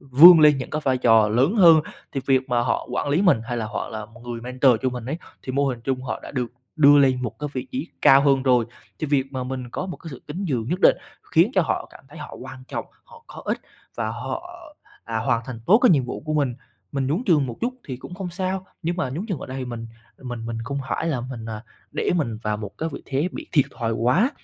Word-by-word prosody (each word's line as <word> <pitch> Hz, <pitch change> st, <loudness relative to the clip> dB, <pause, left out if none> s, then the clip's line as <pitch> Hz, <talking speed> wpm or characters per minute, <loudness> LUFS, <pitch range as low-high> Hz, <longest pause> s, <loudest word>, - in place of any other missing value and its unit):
vươn 155 Hz, +6 st, +9 dB
lên 150 Hz, -2 st, +6 dB
những 130 Hz, -, -6 dB
cái 155 Hz, -, -2 dB
vai 130 Hz, -1 st, +2 dB
trò 115 Hz, -3 st, +5 dB
lớn 130 Hz, -, +2 dB
hơn, 165 Hz, -5 st, +8 dB, 0.3 s
thì 135 Hz, -, -2 dB
việc 130 Hz, 0 st, +2 dB
mà 120 Hz, -1 st, +2 dB
họ -, -, -1 dB
quản -, -, -1 dB
lý 150 Hz, +6 st, +2 dB
mình 170 Hz, -, +4 dB
hay 120 Hz, +1 st, -3 dB
là 110 Hz, -2 st, -2 dB
họ -, -, -4 dB
là 110 Hz, -1 st, -6 dB, 0.2 s
người 120 Hz, -1 st, -5 dB
mentor 125 Hz, +2 st, +3 dB
cho 130 Hz, -, +2 dB
mình 125 Hz, -2 st, -6 dB
ấy, 155 Hz, +5 st, -3 dB, 0.2 s
thì 130 Hz, -, -5 dB
mô 140 Hz, +1 st, +1 dB
hình 125 Hz, -3 st, -2 dB
chung 130 Hz, +1 st, -2 dB
họ -, -, -4 dB
đã -, -, -9 dB
được 125 Hz, -3 st, -3 dB, 0.2 s
đưa 145 Hz, -1 st, +7 dB
lên 130 Hz, -2 st, +3 dB
một 120 Hz, -, -5 dB
cái 150 Hz, 0 st, -3 dB
vị 130 Hz, -1 st, -4 dB
trí 260 Hz, +1 st, -3 dB
cao 135 Hz, +1 st, +8 dB
hơn 135 Hz, -2 st, +3 dB
rồi. 125 Hz, -3 st, +3 dB, 0.3 s
Thì 155 Hz, -, -2 dB
việc 140 Hz, -1 st, 0 dB
mà 130 Hz, -1 st, -3 dB
mình 125 Hz, -1 st, -5 dB
có 185 Hz, -, -4 dB
một 180 Hz, -, -6 dB
cái 165 Hz, -, -10 dB
sự 130 Hz, -, -10 dB
kính 175 Hz, +7 st, -5 dB
nhường 120 Hz, -3 st, -1 dB
nhất 180 Hz, +3 st, -1 dB
định -, -, +6 dB, 0.3 s
khiến -, -, +4 dB
cho -, -, +4 dB
họ -, -, -2 dB
cảm -, -, -16 dB
thấy -, -, -12 dB
họ -, -, -8 dB
quan 130 Hz, 0 st, -10 dB
trọng, -, -, -4 dB, 0.2 s
họ -, -, -17 dB
có -, -, -11 dB
ích -, -, -1 dB, 0.4 s
và 115 Hz, -2 st, -2 dB
họ, 125 Hz, +4 st, -5 dB, 0.5 s
à, 115 Hz, 0 st, -2 dB
hoàn 115 Hz, +1 st, +1 dB
thành 120 Hz, -3 st, -7 dB
tốt 215 Hz, -, +7 dB
cái 250 Hz, -, +7 dB
nhiệm 140 Hz, -6 st, +4 dB
vụ 125 Hz, -, -5 dB
của 155 Hz, -, -1 dB
mình. 140 Hz, -5 st, +1 dB, 0.4 s
Mình 135 Hz, -2 st, -1 dB
nhún 160 Hz, -, 0 dB
trường 150 Hz, -7 st, +4 dB
một 120 Hz, -, -6 dB
chút 250 Hz, +2 st, -1 dB
thì 130 Hz, -3 st, -5 dB
cũng 155 Hz, -, -10 dB
không 190 Hz, 0 st, -5 dB
sao, 185 Hz, +1 st, -3 dB, 0.2 s
nhưng 170 Hz, +2 st, -1 dB
mà 140 Hz, -9 st, -1 dB
nhúng 170 Hz, +10 st, -4 dB
nhường 185 Hz, -7 st, -2 dB
ở -, -, -7 dB
đây 130 Hz, +1 st, -6 dB
thì 130 Hz, -, -3 dB
mình 120 Hz, -2 st, -6 dB, 0.4 s
mình 120 Hz, -3 st, -6 dB
mình 115 Hz, -1 st, -4 dB
không 140 Hz, +3 st, -3 dB
phải 165 Hz, -, -1 dB
là 135 Hz, -7 st, -1 dB
mình, 120 Hz, -2 st, -7 dB
à, 110 Hz, 0 st, -6 dB, 0.3 s
để -, -, -1 dB
mình 115 Hz, -9 st, -1 dB
vào 105 Hz, -1 st, -1 dB
một 105 Hz, -2 st, -8 dB
cái 160 Hz, -, -1 dB
vị -, -, -7 dB
thế 145 Hz, +6 st, -1 dB
bị -, -, -7 dB
thiệt 145 Hz, -5 st, +5 dB
thòi 115 Hz, -2 st, -1 dB
quá 125 Hz, -, +2 dB
130 Hz, 270 wpm, -23 LUFS, 120-150 Hz, 0.5 s, vươn